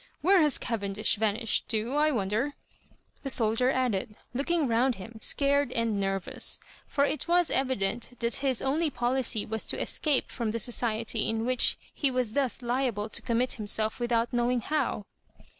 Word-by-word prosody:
Where 370 +3 +5
has 300 -4 +5
Cavendish 215 -2 -1
va 220 - +1
nished 225 -2 0
to, 225 +3 -1
I 305 +1 +4
wonder 230 +3 -1 0.3
?" - - -36
the 275 - -3
soldier 230 +1 +2
added, 245 -5 -1 0.2
lookmg 305 +3 +1
round 240 +2 +2
him, 220 +4 -10
scared 280 0 +3
and 230 -3 0
nervous 195 -2 -1
— - - -25
for 280 -1 +2
it 305 +2 0
was 350 -1 +3
evi 260 -1 +1
dent 195 +4 -2
that 235 0 +1
his 270 -3 0
only 305 +4 +1
policy 245 -3 0
was 220 0 -2
to - - -1
escape 295 -4 0
from 230 -3 -2
society 230 -1 0
in 225 0 -1
which 255 -1 +3 0.2
he 280 - +1
was 250 -4 -1
thus 265 -3 -1
liable 240 -4 -1
to - - -3
commit 240 +2 +1
himself 215 +2 -1
without 235 -1 0
knowing 240 0 +1
how. 275 -7 -1
240 Hz, 175 wpm, -28 LUFS, 220-270 Hz, 0.3 s, Where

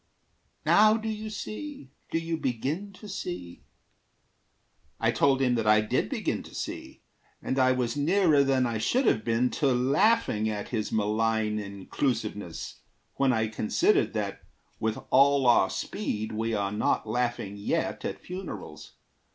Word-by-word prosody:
Now 215 +1 +6
do 225 0 -5
you 215 0 -4
see? 215 - -7 0.2
Do - - 0
you 165 0 -2
begin 150 - -2
to 210 +3 -12
see?" 90 - -6 1.4
I - - +2
told 135 -1 +3
him 125 -1 +3
that 115 -2 0
I 105 0 +6
did 105 - 0
begin - - -2
to - - -13
see; - - -6 0.4
And 130 - -2
I 130 0 +4
was 125 -2 -1
nearer 155 -1 +3
than 135 -2 +2
I 115 -2 -1
should 255 - +1
have 110 - +2
been 115 +3 +1
To 145 - 0
laughing 130 - +2
at 105 -1 -4
his 110 -3 -2
malign 110 0 +1
inclusiveness, 100 - -3 0.4
When 135 -1 +3
I 110 -2 +1
considered 110 0 +1
that, - - -3 0.4
with 110 0 -1
all 140 0 +5
our 120 -1 +5
speed, 110 - -3
We 110 +1 -1
are 100 -1 -1
not 105 +1 0
laughing 110 -3 -2
yet 100 - -2
at - - -3
funerals. 175 - -8
125 Hz, 150 wpm, -28 LUFS, 110-155 Hz, 1.4 s, Now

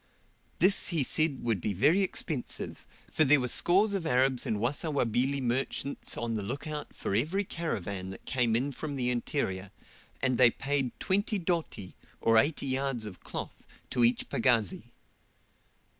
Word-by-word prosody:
This 190 +3 +4
he 165 -5 +2
said 155 +1 +1
would 110 -6 0
be 105 - -1
very 150 - +3
expensive, 160 -7 -2 0.2
for 155 - +3
there 150 0 +5
were 125 - -1
scores 195 - +3
of 185 -5 -2
Arabs 130 -2 +2
and 110 - 0
Wasawabili 135 0 0
merchants 130 +3 -1
on 120 -1 -2
the 110 - -2
look 130 +10 -5
out 150 -1 -5
for - - -3
every 155 - +1
caravan 100 - -4
that 95 - -9
came 120 -3 +1
in 135 +5 0
from 145 +1 -5
the 125 -2 0
interior, 105 -6 -2 0.5
and 130 -2 0
they 125 -2 +8
paid 135 0 -2
20 205 +3 0
doti, 165 - -3 0.2
or 115 0 +4
80 145 +3 0
yards 135 -3 -2
of 95 -5 -9
cloth, - - -7 0.2
to 125 - +2
each 120 +1 +3
pagazi. 115 -5 +2
130 Hz, 160 wpm, -29 LUFS, 115-155 Hz, 0.5 s, they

